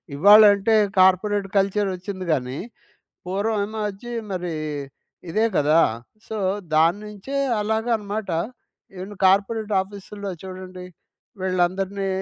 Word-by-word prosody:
ఇవ్వాళంటే 205 +4 +6 0.2
corporate 195 +2 +3
culture 195 +1 +1
ఒచ్చింది 185 0 -6
గానీ, 130 -1 -1 0.7
పూర్వం 205 +4 -1
ఏమో 220 +1 -7
అచ్చి 220 +5 -9 0.2
మరీ, 180 -2 -3 0.8
ఇదే 215 +6 +1
గదా! 150 +3 +4 0.5
సో, 220 - -5 0.4
దాన్నుంచే 205 - 0 0.3
అలాగన్నమాట. 220 -2 -1 0.7
ఎన్ని 205 +2 -8
కార్పొరేట్ 205 +3 +2
ఆఫీస్‌లో 200 0 -8
చూడండి. 185 -1 -8 0.6
వీళ్ళందరిని 190 +2 0
195 Hz, 95 wpm, -23 LUFS, 185-210 Hz, 0.8 s, ఇవ్వాళంటే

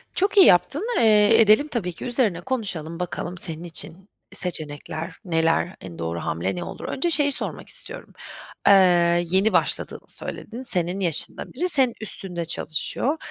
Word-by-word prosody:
Çok 390 +2 +1
iyi 385 - +9
yaptın. 285 - +3
Eee, 220 0 +5
edelim 220 +7 +5
tabii 210 - -3
ki - - -8
üzerine 235 -8 0
konuşalım, 180 -9 -4
bakalım 180 0 -5
senin 165 -2 -5
için 175 +3 -5 0.2
seçenekler 160 0 -1
neler, 165 +1 0
en 85 -3 -10
doğru 85 0 -3
hamle 80 - -3
ne 175 - -4
olur? - - -9
Önce 345 +6 -2
şeyi 295 -3 +2
sormak - - -4
istiyorum; - - -7 0.5
eee, 175 -3 +5
yeni 190 +5 +2
başladığını - - -1
söyledin, 240 +2 -3
senin 185 -7 -1
yaşında 170 -6 -1
biri 360 - +1
senin 265 -7 +4
üstünde 180 -5 -4
çalışıyor. 250 - 0
185 Hz, 150 wpm, -23 LUFS, 170-235 Hz, 0.5 s, iyi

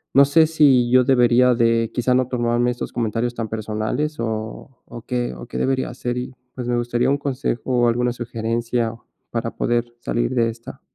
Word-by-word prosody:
no 140 - +8
sé 155 +3 +4
si 140 -6 +4
yo 130 0 +6
debería 125 -1 +4
de, 115 -1 +2
quizá 125 +1 +1
no 130 -1 +2
tomarme 120 0 +1
estos 120 - -5
comentarios 120 +1 -1
tan 115 -1 -3
personales 110 +7 -3
o 110 +2 -4 0.2
o 120 - -10
qué 125 - -2
o - - -9
qué - - -6
debería 130 0 0
hacer 120 0 -4
y, 125 +1 -5 0.2
pues, 125 -2 -5
me 120 0 +1
gustaría 120 +1 0
un 140 - +2
consejo 135 -3 -2
o 120 -2 +2
alguna 120 +1 +1
sugerencia 115 0 -2 0.4
para 115 0 -3
poder 120 0 0 0.2
salir 120 +2 -1
de 115 -1 +2
esta. 115 +1 -10
120 Hz, 185 wpm, -21 LUFS, 115-125 Hz, 0.4 s, no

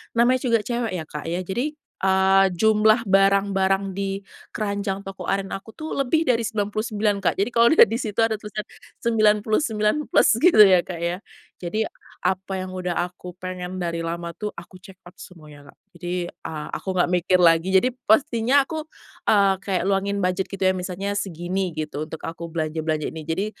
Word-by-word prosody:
namanya 245 +2 +4
juga 230 -4 +2
cewek 240 0 -2
ya, 160 - -3
Kak, 150 -1 -8
ya, 175 +2 -2
jadi, 245 - -3 0.3
eee, 190 0 +4
jumlah 220 +3 +4
barang-barang 195 0 +2
di 195 0 -3 0.3
keranjang 200 -2 -2
toko 195 0 -8
oren 195 0 -1
aku 215 +3 -7
tuh, 310 0 -7
lebih 315 +5 +2
dari 235 -5 +1
99, 210 -1 -1
Kak. 190 - 0
Jadi 200 +5 0
kalau 235 0 +5
dilihat 225 - +7
di 230 - -1
situ 225 -1 0
ada 220 -2 0
tulisan 210 0 -6 0.4
99 215 0 +2
plus, - - +4
gitu 305 -9 +7
ya, 185 -2 +6
Kak, 175 -2 -7
ya. 175 +2 -1 0.4
Jadi, 200 +5 -2 0.4
apa 190 +1 -1
yang 185 0 -5
sudah 180 -1 -3
aku 180 0 -9
pengen 185 0 -5
dari 170 -1 -2
lama 170 +1 -4
tuh, 195 +5 -5
aku 180 +2 -12
checkout 185 -1 -15
semuanya, 150 -5 -13
Kak. - - -33 0.2
Jadi, 175 +1 -5 0.2
eee, 155 -2 -7
aku - - -6
nggak 175 0 +2
mikir 180 +1 +2
lagi. 165 0 +4
Jadi 250 +7 +4 0.2
pastinya 240 +4 +3
aku, 315 +1 -6 0.4
eee, 200 -2 +5
kayak 190 -3 -2
luangin 200 0 0
budget 185 +1 0
gitu 195 -1 -5
ya, 185 - +5
misalnya 190 +2 -3
segini 180 -1 -3
gitu 155 -1 -4
untuk 160 0 -9
aku 170 +1 -6
belanja-belanja 155 -1 -2
ini. 160 0 -9
Jadi, 180 +5 -1
195 Hz, 175 wpm, -23 LUFS, 180-215 Hz, 0.4 s, dilihat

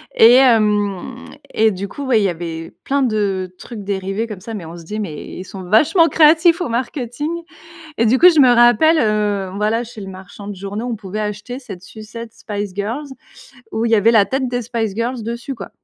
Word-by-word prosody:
et 230 +2 +8
hem 215 -2 +2 0.3
et 220 0 +4
du 195 +1 -5
coup, 280 +5 -7
ouais, 235 -4 +3
il - - +1
y 195 - +2
avait 165 -1 -6
plein 280 0 +1
de 200 -6 -1
trucs 225 -4 -9
dérivés 195 +2 -2
comme 210 -5 -8
ça 225 +4 -8
mais 200 -6 -6
on 165 +2 -9
se 170 - -11
disait: 210 +6 -5
«Mais 160 -8 -5
ils 185 - -6
sont 190 0 -9
vachement 285 - +4
créatifs 330 +2 +4
au 350 - -2
marketing» 255 +6 -3 0.6
et 230 - +2
du 255 +4 +3
coup 360 - +9
je 315 -4 +4
me 255 - +6
rappelle, 240 +7 +5
heu, 210 -3 0
voilà 220 +3 0
chez 225 -2 -11
le 195 - -7
marchand 190 +2 -10
de 205 - -6
journaux 200 +5 -5
on - - -2
pouvait 205 +1 -5
acheter 210 +4 -5
cette 200 -9 -10
sucette 225 +2 -10
Spice 205 -3 -5
Girls 230 +9 -3 0.6
où 225 +1 -1
il 230 - 0
y - - +6
avait 225 +2 +4
la 215 -3 +5
tête 265 +2 -1
des 245 0 -2
Spice 225 -3 -2
Girls 235 +1 -2
dessus, 235 +4 -5
quoi. 195 - -8
220 Hz, 215 wpm, -18 LUFS, 200-245 Hz, 0.6 s, coup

